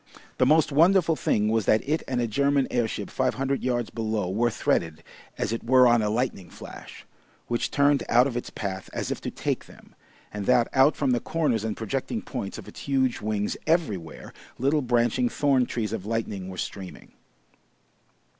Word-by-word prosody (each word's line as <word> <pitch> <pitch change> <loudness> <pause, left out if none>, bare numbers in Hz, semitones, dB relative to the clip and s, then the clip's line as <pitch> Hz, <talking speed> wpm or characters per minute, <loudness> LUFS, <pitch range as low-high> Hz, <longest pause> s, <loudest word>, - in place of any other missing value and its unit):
The 125 - +4
most 155 +2 +4
wonderful 165 +2 +4
thing 105 -7 +1
was 110 -2 0
that 110 +4 +3
it 155 +2 +1
and 125 -2 -1
a 120 - +1
German 140 +4 +1
airship 120 -3 -2
five - - 0
hundred 135 +1 -1
yards 120 -3 -1
below 110 -5 -2
were 120 +5 +2
threaded 80 -6 -1 0.3
as 110 - -1
it 115 - -4
were 125 +1 +6
on 120 0 +5
the 105 - 0
lightning 110 -6 -2
flash, - - -11 0.4
which 120 0 -1
turned 140 -2 +3
out 120 +2 +5
of 135 -3 -3
its 120 - -4
path 95 -2 -5
as - - -3
if - - -4
to - - -3
take - - -3
them, - - -17 0.4
and, 105 -2 -5
that 125 -2 +4
out 135 +3 +5
from 140 -3 0
the 120 - +2
corners 135 -10 0
and 110 -1 -3
projecting 135 - -3
points 115 -7 -5
of - - -10
its - - -11
huge 130 -3 0
wings 105 -1 -1
everywhere, 105 - -1 0.2
little 140 +4 +2
branching 120 0 +1
thorn 135 -3 +2
trees 110 -3 -3
of 110 -4 -4
lightning 105 -4 -3
were 95 - -8
streaming. 95 0 -7
120 Hz, 185 wpm, -26 LUFS, 110-135 Hz, 0.4 s, were